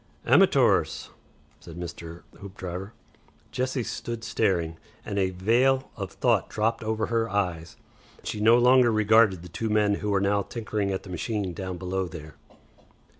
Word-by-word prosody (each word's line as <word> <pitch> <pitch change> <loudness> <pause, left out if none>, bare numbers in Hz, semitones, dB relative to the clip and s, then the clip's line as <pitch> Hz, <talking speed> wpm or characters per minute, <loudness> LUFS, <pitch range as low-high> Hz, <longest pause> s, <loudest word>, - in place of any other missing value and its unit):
"Amatoors," - - +3 0.5
said 85 - -12
Mr. 85 -1 -8 0.2
Hoopdriver. 95 0 -7 0.6
Jessie 130 0 -2
stood 115 0 -5
staring, 85 -8 0 0.3
and 100 - -2
a 95 -1 +2
veil 120 +8 +1
of 100 -3 -6
thought 120 -6 +1
dropped 115 +2 -1
over 110 0 -1
her 115 0 -1
eyes. 90 -5 -2 0.5
She 105 - -4
no 115 +3 +6
longer 125 0 +5
regarded 110 -4 +4
the - - -9
two 110 +7 -4
men 105 -1 +2
who 105 - -2
were 100 -1 +2
now 100 +1 +1
tinkering 105 -1 -3
at 95 -1 -3
the 95 - -10
machine 95 +1 -3
down 95 0 -5
below 95 +1 -2
there. 80 -3 -10
100 Hz, 150 wpm, -26 LUFS, 90-115 Hz, 0.6 s, no